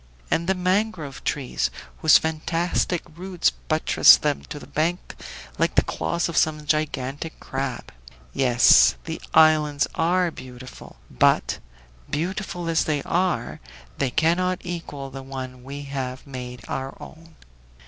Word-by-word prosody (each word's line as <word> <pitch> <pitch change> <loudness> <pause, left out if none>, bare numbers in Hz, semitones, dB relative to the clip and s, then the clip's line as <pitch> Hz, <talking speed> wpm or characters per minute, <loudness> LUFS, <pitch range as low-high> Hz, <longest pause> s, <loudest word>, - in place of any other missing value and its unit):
And 170 +1 +1
the 190 - +2
mangrove 185 -6 -1
trees, 125 - -1 0.3
whose - - +7
fantastic 165 +2 -1
roots 180 0 0
buttress 155 0 +5
them 150 -2 -1
to - - -7
the - - -10
bank 170 +4 -2 0.4
like - - +1
the - - +5
claws 80 - -2
of 170 - -6
some 155 -1 +1
gigantic 150 0 -2
crab! 135 -2 -4 0.4
Yes, 125 - +5
the - - -5
islands 155 -2 +5
are 175 +1 +1
beautiful, 130 -2 -11 0.2
but, - - +2 0.5
beautiful 175 +2 -3
as 165 -1 +1
they 150 -3 -1
are, 180 +1 -1 0.4
they 140 - +1
cannot 180 +7 +1
equal 155 -6 -6
the 135 0 -7
one 130 -2 -7
we 140 +2 -7
have 130 -2 -5
made 125 -3 -8
our 135 0 -4
own!" 165 0 -13
155 Hz, 130 wpm, -24 LUFS, 135-170 Hz, 0.5 s, whose